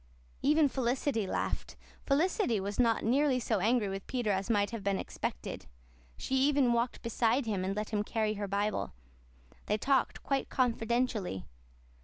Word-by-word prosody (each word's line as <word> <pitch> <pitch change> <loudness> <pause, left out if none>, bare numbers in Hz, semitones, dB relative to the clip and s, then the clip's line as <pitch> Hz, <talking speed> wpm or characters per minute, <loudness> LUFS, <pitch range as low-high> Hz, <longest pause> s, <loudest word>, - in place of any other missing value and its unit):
Even 300 +2 +4
Felicity 250 -3 0
laughed. - - -3 0.3
Felicity 285 - +2
was 200 +3 -4
not 230 -2 +3
nearly 265 +2 +3
so 225 -3 0
angry 220 +2 +2
with 195 0 -5
Peter 245 -5 0
as 195 +1 -1
might 205 -2 +2
have 230 -4 -5
been 195 -1 +1
expected. - - -5 0.5
She - - -5
even 270 -2 +3
walked 235 +1 -1
beside 235 +3 +1
him 200 -4 -1
and 195 +1 -1
let 210 +1 -3
him 210 -2 +1
carry 215 0 0
her 205 -1 -4
Bible. 205 - -1 0.7
They 210 - +1
talked 265 +3 +1
quite 275 -1 -1
confidentially. 235 - 0
230 Hz, 155 wpm, -31 LUFS, 205-255 Hz, 0.7 s, Even